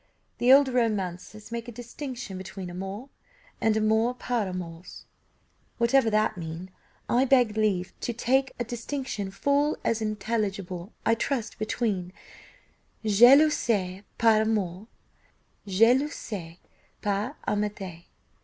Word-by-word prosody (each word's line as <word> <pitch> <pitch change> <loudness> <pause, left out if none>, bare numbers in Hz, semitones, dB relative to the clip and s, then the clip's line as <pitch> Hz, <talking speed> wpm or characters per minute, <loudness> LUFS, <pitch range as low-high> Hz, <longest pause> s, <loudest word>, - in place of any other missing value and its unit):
The 245 +2 +5
old 275 +1 +8
romancers 215 -4 -2
make 235 0 -4
a - - -6
distinction 245 -2 -7
between 185 -1 -7
amour 195 +8 -6 0.5
and 220 -1 +3
amour 220 +3 +2
par 240 -4 -1
amours. 180 -1 -7 0.7
Whatever 235 0 +3
that 215 -2 +1
mean, 165 +3 -7 0.4
I 250 +2 +3
beg 245 -5 +4
leave 200 -5 0
to - - -2
take 260 +3 +1
a 240 - -1
distinction 240 -3 -4
full 285 +9 +1
as 230 -1 +1
intelligible, 200 -3 -3
I 225 - +4
trust, 230 -1 -2
between 210 -5 -2 0.9
jalousie 220 -4 +5
par 225 -2 +5
amour 210 -3 -1 0.8
and - - -7
jalousie 225 - +1 0.5
par 210 +7 -1
amitié. 205 -5 -3
215 Hz, 115 wpm, -27 LUFS, 190-240 Hz, 0.9 s, old